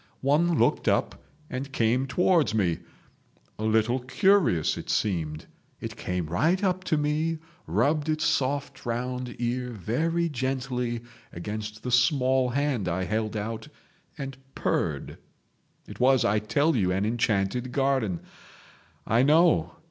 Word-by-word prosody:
One 155 Hz, +5 st, +2 dB
looked -, -, +2 dB
up -, -, +1 dB, 0.2 s
and 135 Hz, +1 st, -5 dB
came 125 Hz, +2 st, +1 dB
towards 160 Hz, -, +2 dB
me, 90 Hz, -6 st, +1 dB, 0.8 s
a -, -, -3 dB
little 110 Hz, +3 st, +2 dB
curious 130 Hz, -, +3 dB
as -, -, -7 dB
it -, -, -13 dB
seemed. 80 Hz, -7 st, -1 dB, 0.3 s
It -, -, -6 dB
came 90 Hz, -2 st, -3 dB
right 160 Hz, -, +1 dB
up 185 Hz, -1 st, +1 dB
to 155 Hz, -, +1 dB
me, 155 Hz, +2 st, 0 dB, 0.3 s
rubbed 150 Hz, +1 st, +1 dB
its 155 Hz, 0 st, 0 dB
soft 140 Hz, -2 st, -1 dB
round 125 Hz, +1 st, -3 dB
ear 125 Hz, +1 st, -2 dB
very 155 Hz, -, -1 dB
gently 125 Hz, -3 st, -2 dB, 0.3 s
against 105 Hz, +4 st, -6 dB
the 125 Hz, -, -3 dB
small 130 Hz, 0 st, +3 dB
hand 130 Hz, -6 st, 0 dB
I 90 Hz, +2 st, -1 dB
held 110 Hz, +2 st, -2 dB
out 110 Hz, +6 st, -4 dB, 0.5 s
and 135 Hz, -2 st, -5 dB, 0.2 s
purred. -, -, -2 dB, 0.7 s
It -, -, -10 dB
was, 130 Hz, -2 st, +4 dB
I 105 Hz, -1 st, +3 dB
tell 145 Hz, +9 st, +1 dB
you, 95 Hz, -6 st, +2 dB
an 95 Hz, +2 st, 0 dB
enchanted 115 Hz, +1 st, 0 dB
garden. 130 Hz, -, 0 dB, 0.8 s
I 115 Hz, +3 st, +3 dB
know. 150 Hz, -, +4 dB
125 Hz, 135 wpm, -27 LUFS, 110-145 Hz, 0.8 s, was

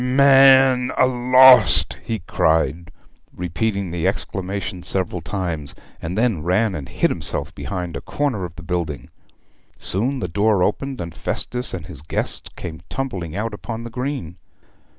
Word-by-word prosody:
man 135 Hz, -1 st, +5 dB
a -, -, +5 dB
lost!' 125 Hz, -3 st, +6 dB
he 115 Hz, -, -3 dB
cried, 80 Hz, 0 st, 0 dB, 0.4 s
repeating 90 Hz, +2 st, -2 dB
the 85 Hz, -2 st, -1 dB
exclamation 95 Hz, -1 st, -4 dB
several 90 Hz, 0 st, -2 dB
times; 85 Hz, -5 st, -4 dB, 0.3 s
and 90 Hz, +4 st, -4 dB
then 110 Hz, -8 st, +1 dB
ran 95 Hz, +6 st, +1 dB
and 70 Hz, -7 st, -6 dB
hid -, -, 0 dB
himself -, -, -2 dB
behind 85 Hz, +4 st, -5 dB
a -, -, -5 dB
corner 140 Hz, -10 st, -2 dB
of 85 Hz, -2 st, -7 dB
the -, -, -11 dB
building. 85 Hz, -4 st, -4 dB, 0.7 s
Soon 125 Hz, +8 st, -1 dB
the 90 Hz, -, -3 dB
door 100 Hz, +3 st, +2 dB
opened, 135 Hz, +7 st, -2 dB
and 85 Hz, -1 st, -6 dB
Festus 125 Hz, +9 st, -3 dB
and 85 Hz, -4 st, -6 dB
his 70 Hz, -2 st, -8 dB
guests 80 Hz, -, -3 dB
came 80 Hz, -2 st, -8 dB
tumbling 95 Hz, -12 st, -4 dB
out 110 Hz, +2 st, -3 dB
upon 115 Hz, +2 st, -6 dB
the 120 Hz, -, -8 dB
green. 125 Hz, -, -4 dB
95 Hz, 150 wpm, -21 LUFS, 85-125 Hz, 0.7 s, lost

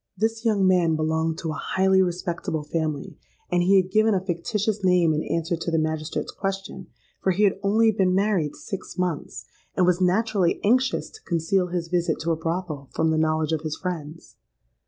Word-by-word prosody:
This 225 Hz, +2 st, -1 dB
young 210 Hz, -4 st, +2 dB
man 175 Hz, -3 st, +3 dB
belonged 160 Hz, +1 st, 0 dB
to 165 Hz, -2 st, -3 dB
a 155 Hz, -, -5 dB
highly 190 Hz, 0 st, +3 dB
respectable 175 Hz, -3 st, -2 dB
family; 155 Hz, -1 st, -3 dB, 0.3 s
and 175 Hz, 0 st, +3 dB
he 190 Hz, +2 st, +5 dB
had 185 Hz, 0 st, -2 dB
given 215 Hz, +1 st, +3 dB
a -, -, +2 dB
fictitious 200 Hz, +4 st, -1 dB
name 180 Hz, -3 st, +4 dB
in 155 Hz, -, -1 dB
answer 165 Hz, +1 st, -1 dB
to 170 Hz, +1 st, -4 dB
the 165 Hz, -, +1 dB
magistrate's 155 Hz, -1 st, -2 dB
question, 195 Hz, -1 st, -5 dB, 0.3 s
for -, -, +1 dB
he 205 Hz, +4 st, +1 dB
had 195 Hz, -1 st, +3 dB
only 220 Hz, +3 st, +3 dB
been 190 Hz, -3 st, +1 dB
married 195 Hz, -7 st, +1 dB
six 195 Hz, -1 st, -7 dB
months, 160 Hz, -9 st, -3 dB, 0.3 s
and 185 Hz, -, +4 dB
was 180 Hz, 0 st, +2 dB
naturally 190 Hz, -1 st, +2 dB
anxious 255 Hz, +5 st, +2 dB
to 440 Hz, -, -14 dB
conceal 180 Hz, -, 0 dB
his 175 Hz, -1 st, -3 dB
visit 175 Hz, -1 st, 0 dB
to 165 Hz, +2 st, 0 dB
a -, -, +2 dB
brothel 160 Hz, -4 st, -4 dB
from 160 Hz, 0 st, +1 dB
the 160 Hz, -, +1 dB
knowledge 155 Hz, 0 st, +1 dB
of 160 Hz, -2 st, 0 dB
his 155 Hz, -1 st, -3 dB
friends. 165 Hz, -3 st, -6 dB
180 Hz, 190 wpm, -24 LUFS, 160-195 Hz, 0.3 s, he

